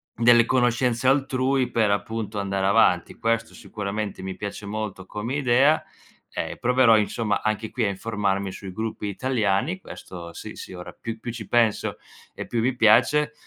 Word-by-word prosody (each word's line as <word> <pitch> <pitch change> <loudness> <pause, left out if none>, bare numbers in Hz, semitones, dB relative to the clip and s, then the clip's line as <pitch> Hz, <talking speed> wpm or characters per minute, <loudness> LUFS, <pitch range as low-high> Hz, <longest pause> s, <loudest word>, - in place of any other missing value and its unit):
delle 120 0 +6
conoscenze 125 0 +2
altrui 135 -1 +1
per 110 -4 +2
appunto 105 0 -2
andare 100 -1 -1
avanti. 95 -4 +3
Questo 115 0 0
sicuramente 105 -1 -5
mi 95 0 -5
piace 100 0 -6
molto 105 -2 -5
come 105 +7 -4
idea, 140 +2 +3 0.5
ehm, - - -4
proverò, 125 -2 +5
insomma, 105 0 0
anche 110 0 -2
qui 125 - -1
a 105 - +2
informarmi 100 -1 -2
sui 95 0 -8
gruppi 110 +1 -4
italiani. 120 - 0
Questo 85 - -9
sì, - - -9
sì, - - -9
ora 90 -1 -9
più 115 0 -6
più 120 +1 -5
ci 115 -3 -7
penso 115 -3 +2 0.4
e - - -7
più 115 - -1
mi 125 +3 +1
piace 130 +7 +4
110 Hz, 160 wpm, -24 LUFS, 100-120 Hz, 0.5 s, delle